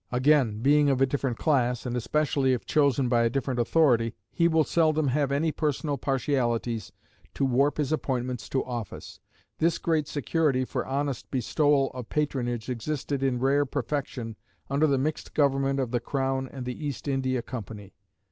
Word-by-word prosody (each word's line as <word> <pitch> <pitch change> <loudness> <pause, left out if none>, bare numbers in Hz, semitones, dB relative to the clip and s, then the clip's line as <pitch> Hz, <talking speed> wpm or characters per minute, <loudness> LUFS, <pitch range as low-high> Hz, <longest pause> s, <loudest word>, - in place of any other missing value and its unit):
Again, 125 -4 +3
being 145 +2 +4
of 135 -2 +2
a 135 - +5
different 135 -3 -2
class, 125 -6 +1
and 125 -1 -2
especially 135 +1 +1
if 125 - -3
chosen 140 -3 +2
by 120 -1 +3
a 115 - +3
different 130 0 -2
authority, 120 -3 +3 0.2
he 170 - +3
will 160 -1 +3
seldom 155 -2 +2
have 140 +1 +1
any 155 +3 +1
personal 150 -1 -1
partialities 125 -4 -1 0.4
to 140 - +1
warp 135 +3 +2
his 150 -2 -1
appointments 125 -5 -2
to 135 - -1
office. 120 -4 -6 0.4
This 165 +1 +2
great 160 -3 0
security 145 -2 0
for - - -3
honest 140 -1 -2
bestowal 140 +2 +2
of 125 -3 -8
patronage 120 -6 -1
existed 135 +2 -3
in 135 -2 +1
rare 135 +3 +2
perfection 130 -4 -4 0.3
under 145 +3 +3
the 140 -2 +2
mixed 150 +4 -3
government 135 -1 +2
of 130 -3 -1
the 120 - +1
crown 135 +1 -2
and 130 -2 -7
the 125 +5 -5
East 145 -2 -4
India 130 -3 0
Company. 105 -5 -8
135 Hz, 165 wpm, -27 LUFS, 125-145 Hz, 0.4 s, a